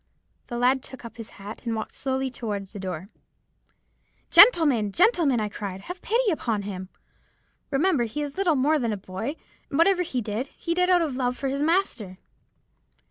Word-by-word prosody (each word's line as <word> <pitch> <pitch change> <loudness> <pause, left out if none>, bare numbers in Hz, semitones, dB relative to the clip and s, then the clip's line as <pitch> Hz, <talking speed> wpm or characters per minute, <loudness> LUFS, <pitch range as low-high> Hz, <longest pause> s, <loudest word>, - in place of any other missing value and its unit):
"The 240 - -4
lad 255 +2 +3
took 260 -2 -10
up 230 - -10
his 225 -2 -8
hat 200 +2 -9
and 230 -2 -2
walked 220 - -4
slowly 265 -1 -2
towards 205 -5 -5
the 205 - -7
door. 185 -2 -5 1.3
"'Gentlemen—gentlemen!' 315 - +5
I 215 - -1
cried, 200 -2 -6
'have 355 - -8
pity 465 -1 +1
upon 225 -10 -1
him. 190 -2 -6 0.8
Remember 295 -2 +2
he 250 +7 -4
is 285 -1 -6
little 365 -5 +2
more 295 +4 +2
than 235 -4 -1
a - - -3
boy; 195 +9 -5 0.3
and 280 - -2
whatever 360 +2 +4
he 295 -8 -2
did, 220 +3 -3
he 335 - -2
did 360 +1 +2
out 355 -2 +5
of 290 -5 -3
love 250 -1 -1
for 270 - -2
his 275 +1 -2
master.' 300 - 0
260 Hz, 180 wpm, -25 LUFS, 215-325 Hz, 1.3 s, Gentlemen—gentlemen